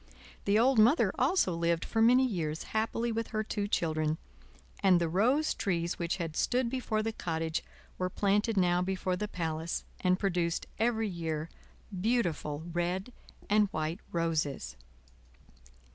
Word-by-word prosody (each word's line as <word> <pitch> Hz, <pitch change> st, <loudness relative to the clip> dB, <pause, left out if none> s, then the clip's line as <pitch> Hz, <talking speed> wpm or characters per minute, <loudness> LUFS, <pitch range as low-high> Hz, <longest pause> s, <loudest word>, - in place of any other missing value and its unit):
The 200 Hz, +1 st, +3 dB
old 245 Hz, +1 st, +4 dB
Mother 235 Hz, +9 st, +5 dB
also 360 Hz, -, +3 dB
lived 170 Hz, 0 st, 0 dB
for 225 Hz, -, 0 dB
many 250 Hz, +3 st, +6 dB
years 165 Hz, -9 st, -2 dB
happily 225 Hz, +2 st, 0 dB
with 230 Hz, 0 st, -2 dB
her 215 Hz, 0 st, -2 dB
two 205 Hz, -1 st, -2 dB
children, 155 Hz, -4 st, 0 dB, 0.6 s
and 185 Hz, -3 st, +5 dB
the 170 Hz, -, +1 dB
rose 245 Hz, -, +2 dB
trees 170 Hz, -4 st, -1 dB
which 170 Hz, +2 st, -1 dB
had 165 Hz, -4 st, -4 dB
stood 245 Hz, +3 st, +1 dB
before 235 Hz, -4 st, -1 dB
the 225 Hz, 0 st, -2 dB
cottage 160 Hz, -4 st, -2 dB, 0.4 s
were 185 Hz, 0 st, 0 dB
planted 205 Hz, +3 st, +1 dB
now 180 Hz, -1 st, +3 dB
before 185 Hz, 0 st, -1 dB
the 210 Hz, +3 st, -3 dB
palace, 165 Hz, -3 st, -3 dB, 0.2 s
and 185 Hz, 0 st, +2 dB
produced 175 Hz, -4 st, 0 dB
every 225 Hz, -1 st, +1 dB
year 165 Hz, -4 st, -3 dB, 0.4 s
beautiful 180 Hz, -8 st, -1 dB
red 180 Hz, +6 st, -2 dB, 0.3 s
and 210 Hz, 0 st, +4 dB
white 155 Hz, +1 st, -3 dB
roses. 160 Hz, -, -1 dB
185 Hz, 145 wpm, -31 LUFS, 165-220 Hz, 0.6 s, many